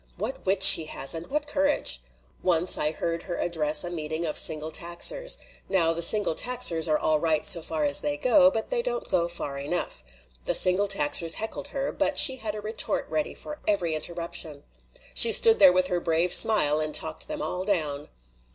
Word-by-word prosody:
What -, -, -7 dB
wit 190 Hz, 0 st, +1 dB
she 195 Hz, -5 st, +11 dB
has, 135 Hz, -3 st, -2 dB
and 165 Hz, +1 st, -7 dB
what 295 Hz, +1 st, -4 dB
courage! 285 Hz, -, -1 dB, 0.4 s
Once 180 Hz, 0 st, +1 dB
I 150 Hz, -, -2 dB
heard 165 Hz, +1 st, -6 dB
her 175 Hz, -1 st, -8 dB
address 155 Hz, -3 st, 0 dB
a 175 Hz, -, -7 dB
meeting 160 Hz, 0 st, -6 dB
of 155 Hz, -, -5 dB
Single 155 Hz, 0 st, +1 dB
Taxers. -, -, -2 dB, 0.3 s
Now, 170 Hz, -4 st, 0 dB
the 170 Hz, -, -6 dB
Single 205 Hz, +1 st, +2 dB
Taxers 175 Hz, -7 st, +2 dB
are 155 Hz, -1 st, 0 dB
all 155 Hz, -1 st, -2 dB
right 155 Hz, -1 st, -2 dB
so 170 Hz, -, +5 dB
far 160 Hz, -1 st, -5 dB
as 145 Hz, -1 st, +2 dB
they 295 Hz, 0 st, -3 dB
go, 275 Hz, 0 st, +2 dB
but 225 Hz, -5 st, -6 dB
they -, -, -1 dB
don't -, -, -6 dB
go 170 Hz, -1 st, -1 dB
far 145 Hz, -5 st, -7 dB
enough. 145 Hz, -, -5 dB, 0.4 s
The -, -, +1 dB
Single 185 Hz, +3 st, +3 dB
Taxers 165 Hz, -3 st, +2 dB
heckled 220 Hz, -, -6 dB
her, 275 Hz, 0 st, -6 dB
but -, -, -3 dB
she 265 Hz, -3 st, +7 dB
had 220 Hz, -3 st, -6 dB
a 210 Hz, -, -8 dB
retort 215 Hz, +1 st, -4 dB
ready 305 Hz, -, -4 dB
for 300 Hz, 0 st, -11 dB
every 180 Hz, -6 st, -2 dB
interruption. 170 Hz, -2 st, -6 dB, 0.5 s
She 230 Hz, -, +6 dB
stood 225 Hz, +1 st, +4 dB
there 190 Hz, -3 st, +6 dB
with 180 Hz, 0 st, 0 dB
her 180 Hz, -1 st, -3 dB
brave 170 Hz, +1 st, -1 dB
smile 155 Hz, -9 st, +3 dB
and 155 Hz, -1 st, -2 dB
talked 160 Hz, -1 st, -4 dB
them 305 Hz, -1 st, -7 dB
all 180 Hz, +1 st, -6 dB
down." 155 Hz, -7 st, -4 dB
175 Hz, 195 wpm, -23 LUFS, 155-220 Hz, 0.5 s, she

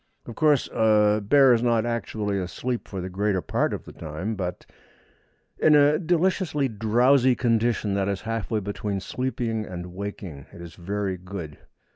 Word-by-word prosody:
Of 120 Hz, -, -8 dB
course, 150 Hz, +1 st, +2 dB
a 105 Hz, -1 st, +3 dB
bear 135 Hz, +4 st, +6 dB
is 115 Hz, -, +2 dB
not 120 Hz, -2 st, +2 dB
actually 110 Hz, -4 st, -2 dB
asleep 120 Hz, +7 st, -4 dB
for 95 Hz, -2 st, -5 dB
the 90 Hz, -, -4 dB
greater 100 Hz, 0 st, 0 dB
part -, -, -1 dB
of -, -, -5 dB
the -, -, -10 dB
time, 80 Hz, +7 st, -5 dB
but 90 Hz, -4 st, -5 dB, 0.9 s
in 155 Hz, -, +5 dB
a 145 Hz, +1 st, +5 dB
deliciously 175 Hz, -4 st, +1 dB
drowsy 120 Hz, +4 st, +3 dB
condition 115 Hz, -4 st, +1 dB
that 100 Hz, 0 st, 0 dB
is 100 Hz, -2 st, -2 dB
halfway 115 Hz, -1 st, -2 dB
between 100 Hz, 0 st, -3 dB
sleeping 115 Hz, 0 st, -3 dB
and 90 Hz, -2 st, -7 dB
waking. 95 Hz, -7 st, -7 dB
It -, -, -13 dB
is 85 Hz, -1 st, -9 dB
very 95 Hz, +1 st, -3 dB
good. 90 Hz, -4 st, -8 dB
110 Hz, 160 wpm, -25 LUFS, 95-125 Hz, 0.9 s, bear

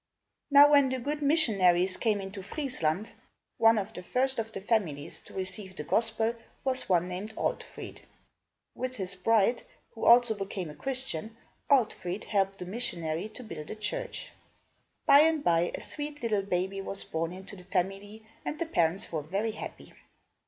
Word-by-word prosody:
Now 290 Hz, 0 st, +8 dB
when 285 Hz, -2 st, +6 dB
the 260 Hz, -, -1 dB
good 290 Hz, +4 st, -3 dB
missionaries 195 Hz, -, +3 dB
came 215 Hz, -3 st, +1 dB
into 195 Hz, 0 st, -6 dB
Friesland, 205 Hz, -, -2 dB, 0.5 s
one 225 Hz, 0 st, +6 dB
of 210 Hz, +2 st, -3 dB
the 180 Hz, -, -6 dB
first 260 Hz, +7 st, 0 dB
of 225 Hz, 0 st, -3 dB
the 195 Hz, -, -4 dB
families 190 Hz, -9 st, -1 dB
to -, -, -13 dB
receive 190 Hz, 0 st, -6 dB
the 150 Hz, -, -5 dB
gospel 225 Hz, +6 st, +1 dB, 0.3 s
was 260 Hz, -4 st, -1 dB
one 180 Hz, -1 st, +3 dB
named 195 Hz, +5 st, -6 dB
Altfrid. -, -, -4 dB, 0.7 s
With 255 Hz, 0 st, -4 dB
his 190 Hz, -3 st, -3 dB
bride, 225 Hz, +4 st, +2 dB, 0.3 s
who 225 Hz, -, -5 dB
also 240 Hz, -1 st, +7 dB
became 195 Hz, -5 st, -5 dB
a -, -, -12 dB
Christian, 230 Hz, -, -4 dB, 0.3 s
Altfrid 215 Hz, -8 st, +1 dB
helped 195 Hz, -2 st, 0 dB
the 180 Hz, -, -6 dB
missionary 180 Hz, -3 st, -3 dB
to 235 Hz, +3 st, -10 dB
build 165 Hz, -8 st, -8 dB
a -, -, -4 dB
church. 485 Hz, -, -3 dB, 0.7 s
By 280 Hz, 0 st, +8 dB
and 315 Hz, -1 st, +4 dB
by, 170 Hz, 0 st, +3 dB
a -, -, -7 dB
sweet 295 Hz, -2 st, -5 dB
little 215 Hz, -3 st, +1 dB
baby 190 Hz, 0 st, -1 dB
was 195 Hz, 0 st, -1 dB
born 165 Hz, +1 st, -2 dB
in 185 Hz, +1 st, -9 dB
the 195 Hz, -2 st, -10 dB
family 195 Hz, +4 st, -3 dB, 0.2 s
and 300 Hz, -, -3 dB
the 335 Hz, -, -1 dB
parents 175 Hz, -, +1 dB
were 160 Hz, -2 st, -1 dB
very 195 Hz, +9 st, -2 dB
happy. 215 Hz, -, -9 dB
205 Hz, 165 wpm, -29 LUFS, 185-245 Hz, 0.7 s, Now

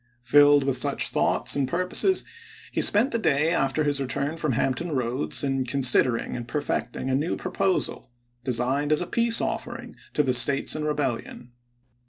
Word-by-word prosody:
Filled 145 Hz, +3 st, +5 dB
with 135 Hz, -1 st, -1 dB
such 125 Hz, -, 0 dB
thoughts -, -, 0 dB
and 140 Hz, -2 st, 0 dB
purposes, 185 Hz, -, +1 dB, 0.5 s
he -, -, -1 dB
spent 230 Hz, +7 st, +3 dB
the 230 Hz, -, -1 dB
day 155 Hz, -4 st, +1 dB
after 135 Hz, +3 st, 0 dB
his 145 Hz, -1 st, 0 dB
return 140 Hz, +3 st, -3 dB
from 155 Hz, -5 st, -2 dB
Hampton 135 Hz, +8 st, -1 dB
Roads 130 Hz, +2 st, -1 dB
in 135 Hz, -1 st, -1 dB
considering 125 Hz, -2 st, +1 dB
and 120 Hz, -1 st, -7 dB
perfecting 145 Hz, 0 st, -3 dB
a 130 Hz, -, -1 dB
new 150 Hz, +5 st, -1 dB
proposal, 185 Hz, -4 st, -2 dB, 0.3 s
designed 130 Hz, +4 st, 0 dB
as 155 Hz, -, +2 dB
a -, -, -2 dB
peace 235 Hz, +4 st, +2 dB
offering -, -, -5 dB, 0.2 s
to 150 Hz, -, +2 dB
the 130 Hz, -2 st, 0 dB
States 135 Hz, +3 st, +4 dB
in 155 Hz, 0 st, -3 dB
rebel 145 Hz, -5 st, -1 dB
lion. 120 Hz, +1 st, -13 dB
140 Hz, 170 wpm, -24 LUFS, 130-155 Hz, 0.5 s, Filled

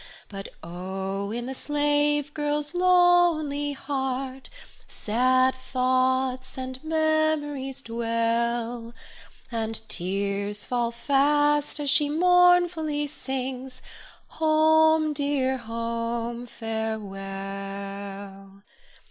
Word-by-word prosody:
But 195 Hz, -1 st, -7 dB, 0.2 s
oh! 190 Hz, +3 st, -4 dB
in 240 Hz, +2 st, -4 dB
the 265 Hz, -, -4 dB
slave 295 Hz, +1 st, +1 dB
girl's 295 Hz, +1 st, -2 dB
lonely 350 Hz, -5 st, +3 dB
heart, 265 Hz, -1 st, -3 dB, 0.4 s
Sad 255 Hz, +4 st, +2 dB
thoughts 255 Hz, 0 st, 0 dB
and 260 Hz, +1 st, -6 dB
memories 310 Hz, -4 st, 0 dB
dwell, 230 Hz, 0 st, -1 dB, 0.6 s
And 225 Hz, -1 st, -1 dB
tears 200 Hz, +3 st, -2 dB
fall 240 Hz, -2 st, 0 dB
fast 290 Hz, +5 st, +2 dB
as 285 Hz, -2 st, +1 dB
she 295 Hz, 0 st, +4 dB
mournfully 350 Hz, -2 st, +4 dB
sings, 265 Hz, -2 st, -5 dB, 0.4 s
Home, 315 Hz, 0 st, +4 dB
dear 280 Hz, -2 st, 0 dB
home, 230 Hz, +1 st, -3 dB
farewell! 195 Hz, -2 st, -6 dB
260 Hz, 80 wpm, -26 LUFS, 225-295 Hz, 0.6 s, she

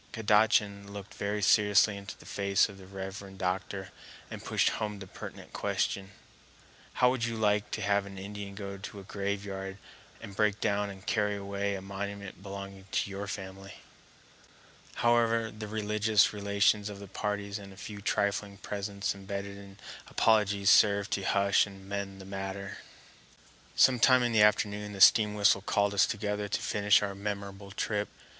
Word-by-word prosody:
Kadachan 105 Hz, -2 st, +2 dB
looked 100 Hz, -1 st, -8 dB
very 105 Hz, +1 st, -2 dB
seriously 105 Hz, 0 st, +5 dB
into 100 Hz, 0 st, -8 dB
the -, -, -16 dB
face 100 Hz, -1 st, +2 dB
of 100 Hz, -1 st, -12 dB
the 95 Hz, -, -13 dB
reverend 95 Hz, 0 st, -7 dB
doctor 95 Hz, +1 st, -3 dB, 0.4 s
and -, -, -7 dB
pushed -, -, +2 dB
home 105 Hz, -2 st, -3 dB
the 100 Hz, -, -8 dB
pertinent -, -, -10 dB
question: 95 Hz, -1 st, -1 dB, 0.8 s
"How 125 Hz, 0 st, +4 dB
would 130 Hz, -3 st, -2 dB
you 115 Hz, -1 st, -3 dB
like 105 Hz, -1 st, +1 dB
to -, -, -3 dB
have 100 Hz, -1 st, +1 dB
an 95 Hz, -1 st, -10 dB
Indian 100 Hz, 0 st, -7 dB
go 100 Hz, -1 st, -6 dB
to 100 Hz, +1 st, -8 dB
a -, -, -10 dB
graveyard 100 Hz, -1 st, -4 dB, 0.4 s
and 100 Hz, -, -10 dB
break 105 Hz, 0 st, +2 dB
down 100 Hz, 0 st, 0 dB
and 95 Hz, 0 st, -11 dB
carry 105 Hz, -1 st, +1 dB
away 100 Hz, 0 st, -2 dB
a 95 Hz, -, -7 dB
monument 100 Hz, 0 st, -6 dB
belonging 100 Hz, -1 st, -8 dB
to 100 Hz, -, 0 dB
your 100 Hz, +1 st, -5 dB
family?" 95 Hz, 0 st, -7 dB, 1.3 s
However, 115 Hz, -1 st, +3 dB
the 110 Hz, 0 st, -7 dB
religious 105 Hz, 0 st, +2 dB
relations 100 Hz, 0 st, +2 dB
of 100 Hz, -, -7 dB
the 100 Hz, -, -9 dB
parties 100 Hz, +1 st, -3 dB
and 100 Hz, -1 st, -11 dB
a 95 Hz, -, -14 dB
few 105 Hz, 0 st, -8 dB
trifling 100 Hz, 0 st, -1 dB
presents 100 Hz, 0 st, -3 dB
embedded 100 Hz, 0 st, -6 dB
in 100 Hz, 0 st, -12 dB, 0.3 s
apologies 105 Hz, -3 st, +3 dB
served 100 Hz, 0 st, +5 dB
to 100 Hz, -, 0 dB
hush 100 Hz, +1 st, +3 dB
and 95 Hz, -1 st, -12 dB
mend 100 Hz, -1 st, -4 dB
the 95 Hz, -, -10 dB
matter. 95 Hz, 0 st, -5 dB, 1.0 s
Some 130 Hz, -2 st, +5 dB
time 130 Hz, +1 st, +6 dB
in 120 Hz, -, +1 dB
the 110 Hz, -2 st, +4 dB
afternoon 105 Hz, 0 st, +2 dB
the 100 Hz, -, -8 dB
steam 105 Hz, +1 st, +7 dB
whistle 100 Hz, -1 st, +4 dB
called 100 Hz, 0 st, +1 dB
us 100 Hz, -, +4 dB
together 105 Hz, -1 st, -2 dB
to -, -, -1 dB
finish 105 Hz, 0 st, +3 dB
our 100 Hz, -1 st, -2 dB
memorable 100 Hz, 0 st, -5 dB
trip. 105 Hz, +1 st, -2 dB
100 Hz, 165 wpm, -30 LUFS, 100-105 Hz, 1.3 s, steam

